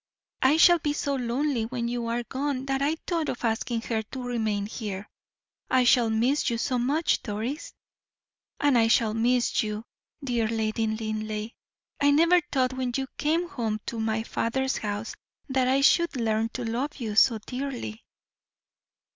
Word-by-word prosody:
I 275 Hz, +4 st, +5 dB
shall 345 Hz, +1 st, +7 dB
be 295 Hz, -1 st, -1 dB
so 285 Hz, -1 st, -1 dB
lonely 250 Hz, -1 st, -1 dB
when 240 Hz, -1 st, -3 dB
you 240 Hz, -1 st, -2 dB
are 235 Hz, +1 st, -1 dB
gone 270 Hz, +1 st, -3 dB
that 270 Hz, 0 st, -1 dB
I 295 Hz, +3 st, +2 dB
thought 335 Hz, -3 st, -1 dB
of 245 Hz, -, -3 dB
asking 225 Hz, +1 st, -1 dB
her 225 Hz, -3 st, -1 dB
to 250 Hz, +4 st, -8 dB
remain 220 Hz, -4 st, -1 dB
here. 205 Hz, -2 st, -5 dB, 0.6 s
I 255 Hz, -1 st, +4 dB
shall 245 Hz, -2 st, +4 dB
miss 245 Hz, +7 st, +2 dB
you 235 Hz, -, -1 dB
so 250 Hz, +1 st, 0 dB
much, 290 Hz, +7 st, +1 dB
Doris." 230 Hz, +8 st, -4 dB, 0.8 s
"And 285 Hz, -4 st, +4 dB
I 225 Hz, -, +4 dB
shall 225 Hz, -1 st, +3 dB
miss 240 Hz, +2 st, +2 dB
you, 215 Hz, -1 st, -3 dB, 0.4 s
dear 240 Hz, -4 st, 0 dB
Lady 220 Hz, 0 st, -1 dB
Linleigh. 215 Hz, 0 st, -3 dB, 0.5 s
I 285 Hz, -, +5 dB
never 335 Hz, +5 st, +5 dB
thought 260 Hz, -2 st, +1 dB
when 255 Hz, -2 st, -2 dB
you 270 Hz, -, -1 dB
came 325 Hz, +4 st, +1 dB
home 225 Hz, -8 st, -2 dB
to 230 Hz, -, -4 dB
my 220 Hz, 0 st, 0 dB
father's 265 Hz, +4 st, -1 dB
house, 210 Hz, +1 st, -4 dB, 0.3 s
that 265 Hz, -2 st, +1 dB
I 265 Hz, +2 st, +3 dB
should 340 Hz, +3 st, +4 dB
learn 225 Hz, -2 st, 0 dB
to 250 Hz, -, -4 dB
love 245 Hz, +6 st, -2 dB
you 225 Hz, -6 st, -4 dB
so 225 Hz, +1 st, +5 dB
dearly." 250 Hz, -1 st, -5 dB
240 Hz, 165 wpm, -27 LUFS, 220-270 Hz, 0.8 s, shall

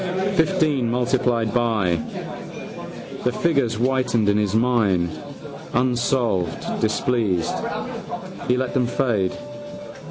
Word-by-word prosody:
Fifteen 160 Hz, -8 st, +2 dB
multiplied 120 Hz, -2 st, +1 dB
by. 110 Hz, -8 st, +2 dB, 1.2 s
The 125 Hz, -, +2 dB
figures 140 Hz, -6 st, +1 dB
whitened 125 Hz, -2 st, +2 dB
in 100 Hz, -, +3 dB
his 105 Hz, -1 st, +1 dB
mind, 110 Hz, -8 st, +3 dB, 0.6 s
unsolved: 120 Hz, -7 st, +1 dB, 0.2 s
displeased, 105 Hz, -9 st, +1 dB, 0.9 s
he 125 Hz, -, +3 dB
let 130 Hz, -1 st, -1 dB
them 125 Hz, -2 st, +2 dB
fade. 110 Hz, -8 st, +1 dB
120 Hz, 90 wpm, -23 LUFS, 105-130 Hz, 1.2 s, in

